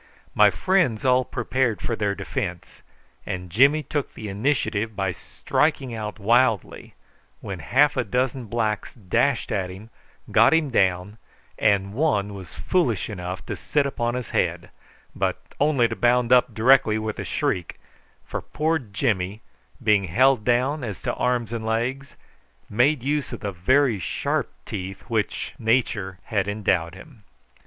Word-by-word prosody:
My - - +6
friends 180 - +1
all 130 0 +4
prepared 120 -2 -1
for 115 - -2
their 100 -2 -1
defence, 100 -3 -5 0.4
and 90 -1 -5
Jimmy 140 - +4
took 145 +1 -3
the 110 -2 -6
initiative 110 -1 -1
by 95 -1 -1
striking 140 - -1
out 110 -1 -5
wildly, 115 0 +1 0.4
when - - -6
half 145 +3 +3
a - - +1
dozen 125 +3 -1
blacks 110 -1 -2
dashed 120 +5 0
at 95 -3 -1
him, 100 +5 -11 0.4
got - - +6
him 155 -4 +1
down, 95 0 +1 0.4
and 100 -2 +2
one 105 -7 0
was 95 -5 -10
foolish 125 - 0
enough 90 -1 -6
to - - -4
sit 145 -2 0
upon 120 -3 -1
his 125 -1 -5
head, - - -1 0.4
but - - -1 0.2
only 140 -5 +3
to 115 - -4
bound 120 0 +2
up 125 -1 +4
directly 115 0 +4
with 110 0 -4
a - - -2
shriek, 90 -2 -2 0.5
for - - -4
poor 160 +2 -1
Jimmy, 100 -3 -2 0.4
being 105 -3 +3
held 125 +6 +3
down 125 +5 +1
as 105 -5 -5
to - - -1
arms 120 -2 -1
and 115 -1 -3
legs, 120 +5 -2 0.6
made 125 +5 +2
use 145 0 -1
of - - -7
the 100 - -3
very 120 +6 +2
sharp 85 - -2
teeth 95 -1 -6
with - - -22
which 110 -3 -1
nature 110 -5 0
had 100 -3 -1
endowed 95 -5 0
him. 115 +4 -14
115 Hz, 150 wpm, -24 LUFS, 100-130 Hz, 0.6 s, My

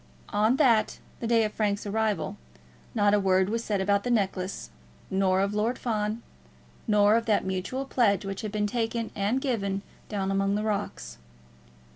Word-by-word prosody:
On 215 +4 +3
that, 240 -7 +3 0.2
the 230 - -3
day 230 -1 +4
of 215 - -2
Frank's 205 -1 -1
arrival, 210 -1 -1 0.6
not 205 -2 +3
a 210 - +4
word 190 -1 +2
was 230 +1 -1
said 205 -3 -1
about 200 +1 +2
the - - -2
necklace, 195 -4 -1 0.4
nor 190 0 +2
of 200 +1 0
Lord 220 +4 0
Fawn, 215 -1 -2 0.6
nor 210 -1 +5
of 230 0 0
that 210 -3 +2
mutual 190 +8 -3
pledge 210 -7 +2
which 195 0 -4
had 215 -2 -4
been 210 0 0
taken 230 0 -2
and 205 +6 0
given 200 -7 -1 0.3
down 195 -2 -1
among 195 +1 +1
the 210 - -1
rocks. 200 - -3
210 Hz, 170 wpm, -27 LUFS, 195-225 Hz, 0.6 s, nor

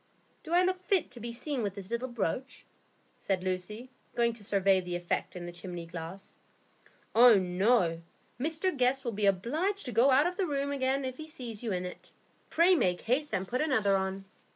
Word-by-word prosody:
"Do - - -10
I 355 +1 +5
look 370 0 0
fit 370 -1 +1
to 245 - -9
be 235 +1 -5
seen 260 +2 -3
with 200 -3 -2
this 200 +1 -9
little 235 +2 -1
brooch?" 240 +3 -3 0.5
said 190 -2 -1
Lucy, 200 +7 -4 0.2
going 235 -1 +2
to 225 -2 -11
survey 195 -1 +3
the 180 -1 -4
effect 175 +1 -2
in 175 -1 -6
the 175 - -6
chimney 175 0 -7
glass. 165 +3 -9 0.7
"Oh 240 0 +8
no, 185 -2 +2 0.4
Mr 325 +6 -1
Guest 260 +1 +1
will 235 - 0
be 205 -1 0
obliged 305 - 0
to 250 - -3
go 235 +5 +4
out 275 +3 +5
of 360 +1 -1
the 385 - 0
room 280 -1 -1
again 270 0 0
if 255 -1 -5
he 310 - -8
sees 245 -9 -6
you 230 -3 -3
in 180 -1 -2
it. 180 - -9 0.4
Pray 345 +3 +5
make 180 - +1
haste 265 +6 0
and 190 0 -1
put 250 +5 -1
another 220 -10 +2
on." 190 0 -2
235 Hz, 200 wpm, -30 LUFS, 190-275 Hz, 0.7 s, Oh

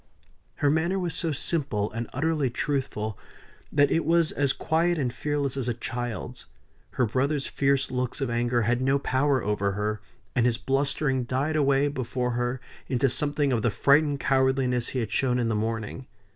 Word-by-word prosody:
Her 145 - +2
manner 170 +5 +1
was 175 -4 -2
so 165 0 -1
simple 135 -8 0
and 115 +1 -4
utterly 150 -1 0
truthful, 120 -5 -2 0.5
that 145 -1 +3
it 165 - +2
was 165 0 +3
as 140 -2 +1
quiet 170 +4 +1
and 130 -5 -1
fearless 145 -1 -2
as 135 -3 -1
a 120 - 0
child's; 120 -1 -5 0.5
her 125 - +2
brother's 135 +5 0
fierce 140 -1 +1
looks 125 -1 -2
of 135 - -1
anger 120 0 +1
had 120 +3 +1
no 135 +1 +3
power 135 -1 +1
over 100 -1 0
her; 105 +1 -2 0.3
and 125 -2 +3
his 120 -1 +2
blustering 135 -1 0
died 135 +6 -1
away 140 -1 +3
before 125 -3 -2
her 120 +2 -1 0.3
into 130 +1 +2
something 145 +1 +1
of 115 - +1
the 120 - +2
frightened 140 +6 +3
cowardliness 130 -3 +1
he 130 - -3
had 110 - -4
shown 125 -2 +1
in 120 -2 0
the - - 0
morning. 110 +3 -3
130 Hz, 175 wpm, -26 LUFS, 120-145 Hz, 0.5 s, that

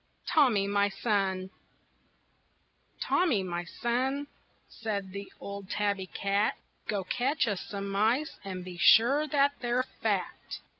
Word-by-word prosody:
TOMMY, 245 -10 +4
MY 200 0 +2
SON 195 -3 -1 1.5
"Tommy, 300 - +2
my 175 -1 -3
son," 260 +8 -1 0.4
said 200 -4 -4
the 200 +1 -7
old 200 -1 -7
tabby 200 -2 -1
cat, 200 +3 0 0.3
"Go 205 -2 -1
catch 255 - 0
us 205 -4 -1
some 200 -1 -5
mice, 220 +10 +1
and 185 -2 -6
be 180 -1 -8
sure 270 - +6
that 280 0 +3
they're 245 +1 +1 0.2
fat. - - -2
205 Hz, 120 wpm, -29 LUFS, 195-250 Hz, 1.5 s, sure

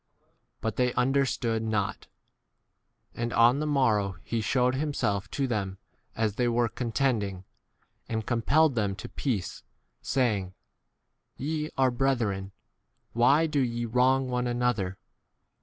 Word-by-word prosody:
But 115 -2 -2
they 125 -1 +2
un 130 +2 +1
20 140 - +3
derstood 115 -3 -1
not. 110 -3 -2 1.1
And 120 0 -3
on 120 +4 +5
the 155 - -1
morrow 110 -9 +2
he 115 -1 -2
shewed 125 +3 +2
himself 130 -9 -1
to 140 - -1
them 100 -6 -2 0.4
as 110 -2 -1
they 125 - +2
were 120 0 +2
contending, 110 -6 -1 0.7
and 110 -2 -2
compelled 140 +6 +3
them 105 -4 0
to 105 - -8
peace, 110 - -3 0.4
saying, 105 -8 0 0.8
Te 150 +2 -2
b - - -13
are 130 -1 +4
brethren, 115 -7 0 0.6
why 140 +7 +4
do 150 -2 0
ye 120 -2 -1
wrong 130 +3 +2
one 125 0 0
2 - - -1
7 120 0 -1
another 105 -7 0
120 Hz, 140 wpm, -28 LUFS, 105-130 Hz, 1.1 s, on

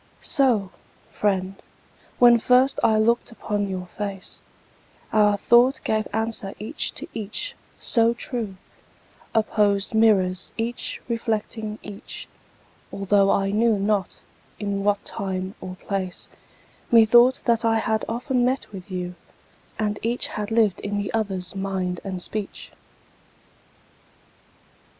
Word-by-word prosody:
So, 235 -10 +2 0.4
friend, 195 -2 -1 0.6
when 240 -1 +7
first 255 +3 +4
I 220 -2 +4
look'd 235 +3 +2
upon 205 -3 -2
your 185 -1 -4
face, 195 0 -6 0.7
Our 210 -1 +4
thought 240 +5 +4
gave 215 0 0
answer 220 -3 -2
each 225 +9 -2
to - - -5
each, 220 - -4 0.2
so 230 -1 +2
true— 235 -7 -4 0.8
Opposed 205 -2 +2
mirrors 190 -5 +3
each 230 +2 -3
reflecting 220 -2 -2
each— 205 -1 -8 0.6
Altho' 195 0 +2
I 195 0 +2
knew 220 +1 +3
not 200 -1 -1 0.3
in 200 -1 -2
what 205 0 +1
time 190 -1 -3
or 185 0 -6
place, 190 -1 -4 0.6
Methought 240 +3 +6
that 235 -2 +2
I 225 -1 +3
had 220 0 0
often 245 +2 0
met 255 -1 -1
with 195 -1 -9
you, 180 -1 -4 0.6
And 210 -1 -1
each 235 +2 0
had 210 0 -4
lived 225 -4 +2
in 205 0 -3
the 205 -2 -3
other's 190 -5 -2
mind 190 -2 -2
and 185 -3 -4
speech. 210 -2 -5
210 Hz, 120 wpm, -24 LUFS, 195-230 Hz, 0.8 s, when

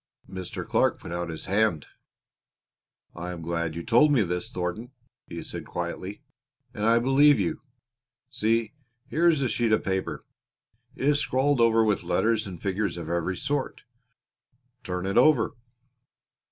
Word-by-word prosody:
Mr. 95 -1 -6
Clark - - +2
put - - -9
out 85 0 -3
his 80 -1 -6
hand. 100 -6 +1 1.3
"I 90 +1 -6
am 85 -2 -6
glad 85 -1 -2
you 85 - -5
told 135 - +4
me 125 -7 +4
this, 90 -1 -3
Thornton," 90 +8 -4 0.3
he - - -7
said - - -6
quietly, 90 +3 -5 0.5
"and 105 +1 -1
I 115 +1 +5
believe 135 +3 +5
you. 90 -4 -1 0.7
See, 115 -1 0 0.4
here 170 +2 +3
is 155 -5 +3
a - - +2
sheet 120 -1 0
of 110 - +2
paper; 95 -1 -3 0.7
it 135 - -2
is 145 0 +4
scrawled 135 -1 +1
over 115 -1 +5
with 105 -2 +1
letters 110 +4 +1
and 90 -3 -8
figures 100 -1 -2
of 85 -1 -5
every 85 +2 -1
sort. 145 - -2 1.0
Turn 90 0 -4
it 95 +4 +2
over." 130 -3 +4
105 Hz, 155 wpm, -26 LUFS, 90-120 Hz, 1.3 s, I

